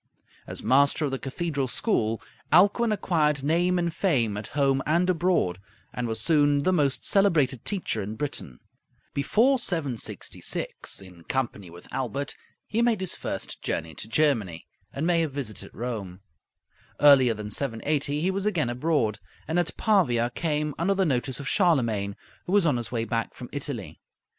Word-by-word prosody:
As -, -, -6 dB
master 140 Hz, +6 st, +4 dB
of 140 Hz, -, -2 dB
the 135 Hz, -, -2 dB
cathedral 140 Hz, -1 st, -2 dB
school, 115 Hz, -, 0 dB, 0.3 s
Alcuin 210 Hz, +5 st, +5 dB
acquired 150 Hz, -8 st, +1 dB
name 175 Hz, +5 st, +2 dB
and 170 Hz, -1 st, 0 dB
fame 130 Hz, -, +1 dB
at 105 Hz, 0 st, -5 dB
home 135 Hz, -1 st, +3 dB
and 170 Hz, +4 st, +3 dB
abroad, 175 Hz, -, +1 dB, 0.3 s
and 125 Hz, -1 st, -2 dB
was 110 Hz, -1 st, 0 dB
soon 145 Hz, -3 st, +3 dB
the 185 Hz, -, +2 dB
most 145 Hz, -6 st, +1 dB
celebrated 155 Hz, -, +3 dB
teacher 185 Hz, -, -1 dB
in 105 Hz, +2 st, -5 dB
Britain. 110 Hz, -, -5 dB, 0.5 s
Before 235 Hz, -, +3 dB
766, 145 Hz, -, -4 dB
in 90 Hz, -3 st, -14 dB
company 120 Hz, -8 st, -2 dB
with 85 Hz, +1 st, -13 dB
Aelbert, 135 Hz, +2 st, -3 dB, 0.3 s
he 225 Hz, +2 st, 0 dB
made 235 Hz, -3 st, +2 dB
his 190 Hz, -2 st, -3 dB
first -, -, -5 dB
journey 80 Hz, 0 st, -3 dB
to -, -, -7 dB
Germany, 110 Hz, -, +1 dB, 0.3 s
and 140 Hz, -, -3 dB
may 170 Hz, -1 st, +3 dB
have 155 Hz, -4 st, -2 dB
visited 130 Hz, -7 st, -5 dB
Rome. 105 Hz, -6 st, -5 dB, 0.8 s
Earlier 135 Hz, -5 st, +6 dB
than 105 Hz, 0 st, -6 dB
780 140 Hz, +5 st, -1 dB
he 185 Hz, +3 st, +1 dB
was 195 Hz, +2 st, -1 dB
again 160 Hz, -, 0 dB
abroad, 120 Hz, -5 st, 0 dB, 0.3 s
and 160 Hz, +3 st, +1 dB
at 170 Hz, -2 st, -2 dB
Pavia 125 Hz, -, +2 dB
came 150 Hz, +1 st, -1 dB
under 195 Hz, +4 st, +2 dB
the 190 Hz, -1 st, +2 dB
notice 130 Hz, -3 st, -1 dB
of 140 Hz, -, -6 dB
Charlemagne, 115 Hz, -, +2 dB, 0.3 s
who 180 Hz, -, -2 dB
was 205 Hz, -3 st, +4 dB
on 145 Hz, -6 st, +3 dB
his 120 Hz, -, -5 dB
way 115 Hz, -2 st, -1 dB
back 115 Hz, +1 st, -2 dB
from 125 Hz, -, -9 dB
Italy. 140 Hz, -7 st, -5 dB
140 Hz, 160 wpm, -26 LUFS, 115-170 Hz, 0.8 s, Earlier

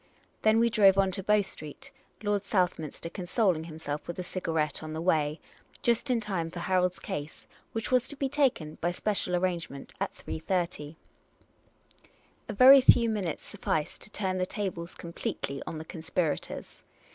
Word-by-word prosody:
Then 220 Hz, 0 st, +4 dB
we 235 Hz, 0 st, +3 dB
drove 200 Hz, -3 st, +6 dB
on 195 Hz, -1 st, +3 dB
to 195 Hz, -, -3 dB
Bow 210 Hz, +2 st, +4 dB
Street 195 Hz, -, -8 dB, 0.3 s
(Lord 205 Hz, -1 st, +1 dB
Southminster 175 Hz, -6 st, -1 dB
con 175 Hz, +1 st, -7 dB
soling 180 Hz, -6 st, +2 dB
himself 155 Hz, -2 st, -5 dB
with 170 Hz, -, -5 dB
a 180 Hz, -, -3 dB
cigarette 165 Hz, -5 st, -1 dB
on 155 Hz, 0 st, -6 dB
the 160 Hz, -, -3 dB
way), 155 Hz, -3 st, +1 dB, 0.4 s
just 235 Hz, +3 st, +2 dB
in 245 Hz, -2 st, +3 dB
time 190 Hz, -7 st, -2 dB
for 175 Hz, -, -10 dB
Harold's 180 Hz, +1 st, +1 dB
case, 145 Hz, +1 st, -6 dB, 0.3 s
which 225 Hz, +2 st, -4 dB
was 255 Hz, -1 st, +3 dB
to 290 Hz, -, -4 dB
be 275 Hz, -1 st, -1 dB
taken, 260 Hz, -, 0 dB
by 175 Hz, -, +2 dB
special 180 Hz, 0 st, 0 dB
arrange 175 Hz, -2 st, 0 dB
ment, 140 Hz, 0 st, -10 dB
at -, -, 0 dB
3.30. 165 Hz, -3 st, -3 dB, 1.5 s
A -, -, -2 dB
very 265 Hz, +6 st, +9 dB
few 235 Hz, -2 st, +6 dB
minutes 195 Hz, -7 st, -2 dB
sufficed 155 Hz, -1 st, -2 dB
to -, -, -8 dB
turn 190 Hz, -3 st, -2 dB
the 185 Hz, -, 0 dB
tables 180 Hz, -5 st, -4 dB
completely 170 Hz, -4 st, -4 dB
on 160 Hz, -, -4 dB
the 160 Hz, -, -7 dB
conspirators. 160 Hz, -1 st, -3 dB
180 Hz, 170 wpm, -29 LUFS, 160-210 Hz, 1.5 s, very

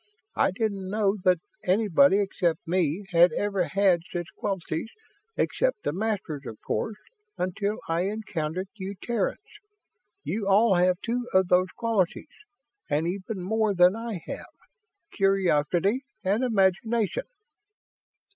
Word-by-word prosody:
I -, -, +3 dB
didn't 195 Hz, -1 st, -2 dB
know 205 Hz, 0 st, +1 dB
that 180 Hz, -1 st, +5 dB, 0.3 s
anybody 190 Hz, 0 st, +4 dB
except 175 Hz, -5 st, -1 dB
me 175 Hz, +1 st, 0 dB
had 175 Hz, +1 st, +6 dB
ever 200 Hz, -3 st, 0 dB
had 190 Hz, -3 st, +3 dB
such 175 Hz, -1 st, -3 dB
qualities 190 Hz, -1 st, -3 dB, 0.5 s
except -, -, 0 dB
the -, -, -1 dB
Masters, 190 Hz, -7 st, -2 dB
of 110 Hz, -, -8 dB
course 215 Hz, -1 st, -2 dB, 0.4 s
until 200 Hz, +4 st, -1 dB
I 165 Hz, +2 st, 0 dB
encountered 185 Hz, -4 st, -3 dB
you 200 Hz, -2 st, -6 dB
Terrans. 235 Hz, -5 st, -1 dB, 0.9 s
You 205 Hz, -1 st, -2 dB
all 205 Hz, +2 st, +5 dB
have 180 Hz, 0 st, +3 dB
two 240 Hz, +1 st, -1 dB
of 190 Hz, -1 st, +4 dB
those 185 Hz, +1 st, +4 dB
qualities, 225 Hz, -, 0 dB, 0.6 s
and 155 Hz, +2 st, +1 dB
even 190 Hz, +1 st, -4 dB
more 215 Hz, +1 st, +1 dB
than 180 Hz, +2 st, +5 dB
I 225 Hz, -4 st, -4 dB
have -, -, -7 dB, 0.6 s
curiosity 195 Hz, -, +2 dB, 0.2 s
and 205 Hz, +6 st, +1 dB
imagination." 220 Hz, -, +1 dB
195 Hz, 125 wpm, -26 LUFS, 180-215 Hz, 0.9 s, had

